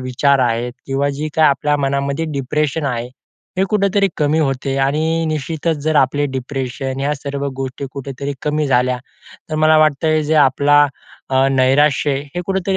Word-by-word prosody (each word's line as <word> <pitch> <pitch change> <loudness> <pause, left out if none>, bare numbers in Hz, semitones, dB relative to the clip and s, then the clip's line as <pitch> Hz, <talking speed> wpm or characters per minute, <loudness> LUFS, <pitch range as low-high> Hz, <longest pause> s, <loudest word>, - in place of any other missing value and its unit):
विचार 130 +2 +1
आहेत 120 +1 -2
किंवा 135 +1 0
जे 155 +1 -2
काही 155 -1 +5
आपल्या 145 +1 +1
मनामध्ये 140 +2 -1
डिप्रेशन 145 +2 -1
आहे. 120 -2 -2 0.5
हे 190 - +3
कुठेतरी 200 -1 +2
कमी 150 +1 +1
होते 135 -2 -1
आणि 160 +4 +1
निश्चितच 155 +2 -2
जर 155 -1 +1
आपले 145 +2 +2
डिप्रेशन 130 0 -4
ह्या 145 +2 0
सर्व 140 0 -5
गोष्टी 135 +1 -5
कुठेतरी 140 +1 -5
कमी 150 0 0
झाल्या. 125 -1 +2 0.5
तर 155 - -2
मला 155 0 +4
वाटतंय 155 +1 +2
जे 155 +2 0
आपला 145 +2 +4 0.4
अ, 130 0 +3
नैराश्य 140 +2 +3 0.2
हे 180 - -2
कुठेतरी 190 0 0
140 Hz, 155 wpm, -18 LUFS, 135-155 Hz, 0.5 s, काही